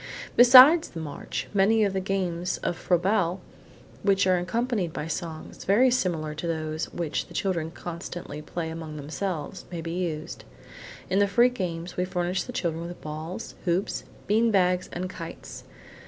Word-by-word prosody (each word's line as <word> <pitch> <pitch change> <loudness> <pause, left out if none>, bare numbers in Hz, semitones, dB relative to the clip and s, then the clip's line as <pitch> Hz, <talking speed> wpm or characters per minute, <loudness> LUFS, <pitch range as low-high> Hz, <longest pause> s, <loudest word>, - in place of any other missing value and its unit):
Besides 255 +7 +9
the 165 - -7
march, 150 -3 -5
many 210 +3 +4
of 200 -2 +1
the 190 - 0
games 185 -2 -1
of - - 0
Froebel 180 +1 +1 0.6
which 195 -1 +3
are 185 -1 +3
accompanied 205 -1 -1
by - - -4
songs, 165 0 -6
very 240 +7 +4
similar 170 -11 0
to 155 +3 -5
those 155 -1 -2
which 165 -4 -3
the - - -13
children 170 -5 -1
constantly 170 -3 -7
play 160 +1 -4
among 160 -2 -7
themselves, 160 +3 -4
may 175 - -4
be 165 0 -5
used. 170 -3 -4 0.7
In 190 - +3
the 205 - +4
free 240 +5 +5
games, 175 -7 -5
we 180 - +1
furnish 180 0 -1
the - - -6
children 170 -7 -2
with 175 - -9
balls, 155 +3 -6
hoops, 180 +2 0 0.2
bean 225 +3 +3
bags 185 -3 +2
and 180 +1 -3
kites. 170 -2 -9
180 Hz, 160 wpm, -26 LUFS, 165-195 Hz, 0.7 s, Besides